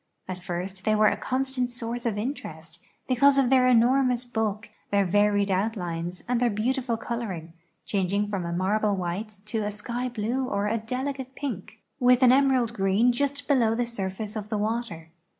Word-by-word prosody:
At 185 -1 -5
first 190 +1 -5
they 215 +2 +2
were 215 0 +5
a - - -1
constant 260 -1 -1
source 240 0 -3
of 215 -3 -1
interest, 165 - -5 0.3
because 275 +2 +4
of 265 -2 +3
their 255 -1 +5
enormous 250 +1 +3
bulk, 220 -3 -2 0.2
their 200 -1 +2
varied 205 +1 +2
outlines, 180 -4 -2
and 245 -1 +1
their 245 0 +3
beautiful 240 +3 -1
coloring, 200 -9 -5 0.3
changing 200 +1 0
from 200 -3 -3
a 170 - -4
marble 200 +4 +1
white 195 +4 -4
to 220 +1 -2
a 210 -1 -2
sky 240 +4 -3
blue 240 +3 -1
or 200 -6 -1
a 225 +2 0
delicate 260 +3 -4
pink, 225 -5 -6 0.2
with 250 0 +5
an 250 - +7
emerald 260 -3 +3
green 200 +3 +3
just 280 +3 -2
below 235 -6 +3
the 240 +1 0
surface 205 -1 -4
of 210 -1 -5
the 215 - -1
water. 210 -7 -3
220 Hz, 175 wpm, -26 LUFS, 200-250 Hz, 0.3 s, an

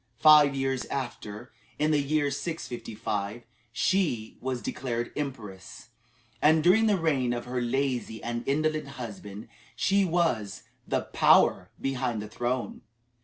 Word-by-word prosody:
Five 150 +1 +7
years 135 -1 -1
after, 110 -6 -6 0.3
in 155 +1 +1
the 150 -1 +3
year 145 0 +1
655, 120 -8 -4 0.3
she 125 - 0
was 130 -1 -3
declared 120 -2 -3
Empress, 115 -7 -6 0.5
and 155 +1 +5
during 210 +6 +5
the 205 -2 +3
reign 140 -8 +1
of 120 0 -4
her 125 0 -2
lazy 125 -2 -1
and 120 0 -3
indolent 155 +1 0
husband 105 -3 -8 0.3
she 195 +1 +2
was 165 - 0 0.2
"the - - 0
power - - +4
behind 130 -4 -1
the 105 - -5
throne." 120 +3 -3
130 Hz, 125 wpm, -28 LUFS, 120-155 Hz, 0.5 s, Five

